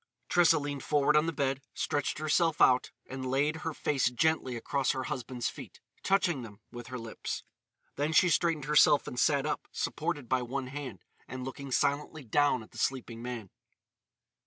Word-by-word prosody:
Tressa 170 Hz, -2 st, +5 dB
leaned 145 Hz, -1 st, -3 dB
forward 150 Hz, 0 st, +2 dB
on 150 Hz, +2 st, +4 dB
the -, -, +1 dB
bed, 135 Hz, -2 st, -1 dB
stretched 145 Hz, -1 st, -1 dB
herself 155 Hz, +1 st, +1 dB
out, 125 Hz, 0 st, +5 dB, 0.2 s
and 130 Hz, 0 st, -5 dB
laid 145 Hz, +4 st, +1 dB
her 165 Hz, 0 st, -3 dB
face 140 Hz, -4 st, +1 dB
gently 130 Hz, 0 st, +1 dB
across 135 Hz, +3 st, 0 dB
her 130 Hz, -, -3 dB
husband's 125 Hz, -1 st, -3 dB
feet, -, -, -8 dB, 0.2 s
touching 185 Hz, -7 st, +2 dB
them 105 Hz, -4 st, -10 dB
with 120 Hz, -1 st, -8 dB
her 130 Hz, +1 st, -5 dB
lips. 115 Hz, -2 st, -5 dB, 0.5 s
Then 145 Hz, +2 st, 0 dB
she 170 Hz, +3 st, +5 dB
straightened 165 Hz, -3 st, +1 dB
herself 150 Hz, -1 st, +5 dB
and 125 Hz, -, -5 dB
sat 140 Hz, 0 st, +3 dB
up, -, -, -3 dB
supported 150 Hz, -5 st, -3 dB
by 130 Hz, 0 st, +1 dB
one 130 Hz, +2 st, -3 dB
hand, 130 Hz, -, -7 dB, 0.2 s
and 130 Hz, +1 st, -6 dB
looking 135 Hz, +1 st, -7 dB
silently 145 Hz, +3 st, 0 dB
down 130 Hz, 0 st, +2 dB
at -, -, -17 dB
the -, -, -10 dB
sleeping 120 Hz, -3 st, -2 dB
man. 120 Hz, -5 st, -6 dB
140 Hz, 175 wpm, -30 LUFS, 125-150 Hz, 0.5 s, Tressa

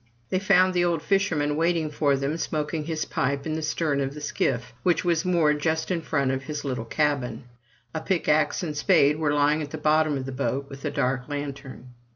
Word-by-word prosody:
They 185 Hz, -, +1 dB
found 185 Hz, -1 st, +4 dB
the 175 Hz, -1 st, +2 dB
old 170 Hz, -3 st, 0 dB
fisherman 165 Hz, -7 st, +1 dB
waiting 165 Hz, -1 st, +1 dB
for 145 Hz, -2 st, +2 dB
them, 135 Hz, +3 st, -1 dB
smoking 155 Hz, -1 st, -2 dB
his 160 Hz, -1 st, -2 dB
pipe 140 Hz, +1 st, -1 dB
in 155 Hz, -, -2 dB
the 160 Hz, -, -2 dB
stern 155 Hz, -2 st, 0 dB
of 135 Hz, +1 st, -3 dB
the -, -, -6 dB
skiff, 125 Hz, -4 st, -1 dB
which 180 Hz, 0 st, +1 dB
was 170 Hz, -1 st, +2 dB
moored 165 Hz, -5 st, +2 dB
just 160 Hz, +3 st, -1 dB
in 170 Hz, -2 st, 0 dB
front 140 Hz, -4 st, 0 dB
of 135 Hz, 0 st, -3 dB
his 150 Hz, -1 st, -5 dB
little 125 Hz, -4 st, -3 dB
cabin. 135 Hz, -3 st, -1 dB, 0.5 s
A 160 Hz, -, -3 dB
pickaxe 160 Hz, -3 st, +1 dB
and 155 Hz, -3 st, -3 dB
spade 150 Hz, -2 st, +3 dB
were 150 Hz, -2 st, +1 dB
lying 145 Hz, +1 st, +2 dB
in 145 Hz, -, -5 dB
the -, -, -6 dB
bottom 155 Hz, -1 st, +2 dB
of 130 Hz, -, -4 dB
the 135 Hz, -, -5 dB
boat, 135 Hz, +1 st, -2 dB
with 135 Hz, 0 st, -10 dB
a -, -, +1 dB
dark 135 Hz, -2 st, -1 dB
lantern. 140 Hz, -3 st, -6 dB
150 Hz, 210 wpm, -25 LUFS, 140-160 Hz, 0.5 s, found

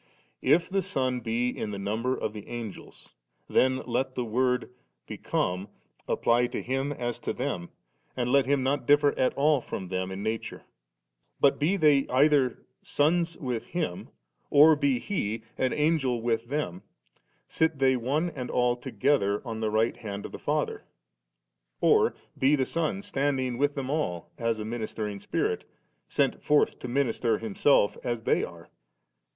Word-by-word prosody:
If 170 Hz, +1 st, +3 dB
the 195 Hz, 0 st, 0 dB
Son 130 Hz, -10 st, -1 dB
be 120 Hz, +1 st, 0 dB
in 110 Hz, -, -4 dB
the 100 Hz, -, -4 dB
number 110 Hz, +6 st, -1 dB
of 105 Hz, -, -3 dB
the 105 Hz, -2 st, -9 dB
Angels, 115 Hz, -4 st, -8 dB, 0.3 s
then 130 Hz, 0 st, +2 dB
let 130 Hz, +2 st, -1 dB
the 125 Hz, -, -1 dB
word 125 Hz, +2 st, 0 dB, 0.2 s
* -, -, -52 dB
become 90 Hz, +3 st, -2 dB, 0.2 s
' -, -, -38 dB
apply 120 Hz, +1 st, +2 dB
to -, -, -5 dB
Him 135 Hz, +3 st, -1 dB
as 120 Hz, -4 st, -3 dB
to -, -, -3 dB
them, 85 Hz, 0 st, -3 dB, 0.5 s
and 125 Hz, -1 st, 0 dB
let 140 Hz, -2 st, +4 dB
Him 140 Hz, -1 st, +2 dB
not 135 Hz, -1 st, 0 dB
differ 145 Hz, 0 st, +5 dB
at 130 Hz, -, +2 dB
all 145 Hz, -1 st, +3 dB
from 95 Hz, -5 st, -6 dB
them 95 Hz, 0 st, -2 dB
in 95 Hz, +1 st, -5 dB
nature; 110 Hz, +1 st, -4 dB, 0.8 s
but 140 Hz, -, +4 dB
be 170 Hz, +7 st, +2 dB
they 150 Hz, -5 st, +4 dB
either 135 Hz, -1 st, +3 dB, 0.2 s
sons 165 Hz, +3 st, +1 dB
with 125 Hz, -8 st, -3 dB
Him, 165 Hz, -, -3 dB, 0.4 s
or 155 Hz, +2 st, +7 dB
be 140 Hz, -3 st, +1 dB
He 115 Hz, -, -3 dB
an 130 Hz, -, 0 dB
Angel 150 Hz, -5 st, +1 dB
with 115 Hz, 0 st, -1 dB
them; 125 Hz, -, -3 dB, 0.7 s
sit 160 Hz, -2 st, +1 dB
they 135 Hz, -1 st, +3 dB
one 145 Hz, +8 st, 0 dB
and 125 Hz, -4 st, -6 dB
all 125 Hz, -1 st, +2 dB
together 120 Hz, -3 st, +1 dB
on 115 Hz, -2 st, -4 dB
the 110 Hz, -1 st, 0 dB
right 110 Hz, +2 st, +1 dB
hand 100 Hz, -2 st, -6 dB
of -, -, -7 dB
the -, -, -8 dB
Father, -, -, -1 dB, 1.0 s
or -, -, +4 dB, 0.2 s
be 135 Hz, +3 st, +3 dB
the 135 Hz, -2 st, +1 dB
Son 165 Hz, +6 st, -2 dB
standing 135 Hz, -5 st, -1 dB
with 145 Hz, 0 st, +1 dB
them 135 Hz, -1 st, -3 dB
all 90 Hz, -, -2 dB
as 115 Hz, -1 st, 0 dB
a 105 Hz, -, -5 dB
ministering 110 Hz, -2 st, -4 dB
Spirit, -, -, -1 dB, 0.4 s
sent -, -, 0 dB
forth 150 Hz, 0 st, +2 dB
to -, -, -6 dB
minister 120 Hz, -3 st, +1 dB
Himself 110 Hz, 0 st, +2 dB
as 120 Hz, -2 st, -2 dB
they -, -, +2 dB
are. -, -, -9 dB
125 Hz, 165 wpm, -28 LUFS, 115-145 Hz, 1.0 s, or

